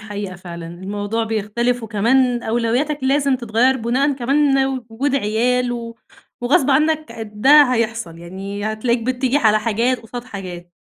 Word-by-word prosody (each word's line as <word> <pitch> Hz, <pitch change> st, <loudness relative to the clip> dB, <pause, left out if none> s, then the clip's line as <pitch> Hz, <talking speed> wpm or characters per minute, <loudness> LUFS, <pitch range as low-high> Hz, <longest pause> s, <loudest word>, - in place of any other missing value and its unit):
حقيقة 205 Hz, -3 st, -6 dB
فعلًا 170 Hz, -2 st, -8 dB
الموضوع 205 Hz, +6 st, -3 dB
بيختلف 225 Hz, +3 st, -1 dB
وكمان 240 Hz, +3 st, +1 dB
أولوياتك 240 Hz, +6 st, 0 dB
لازم 275 Hz, 0 st, +2 dB
تتغير 240 Hz, +2 st, +2 dB
بُناءً 260 Hz, +4 st, +1 dB
كمان 275 Hz, +1 st, +2 dB, 0.2 s
وجود 260 Hz, +5 st, -1 dB
عيال، 245 Hz, +1 st, +1 dB
و 230 Hz, -1 st, -6 dB, 0.4 s
وغصب 260 Hz, +3 st, +2 dB
عنك 310 Hz, +2 st, +2 dB
ع 225 Hz, -, -7 dB
ده 260 Hz, +8 st, +5 dB
هيحصل 225 Hz, -7 st, -2 dB
يعني 195 Hz, +5 st, -5 dB
هتلاقيك 235 Hz, +2 st, -1 dB
بتيجي 255 Hz, +2 st, 0 dB
على 215 Hz, -6 st, +4 dB
حاجات 230 Hz, +4 st, 0 dB
قُصاد 240 Hz, +2 st, -8 dB
حاجات. 180 Hz, -6 st, -8 dB
230 Hz, 140 wpm, -19 LUFS, 210-260 Hz, 0.4 s, ده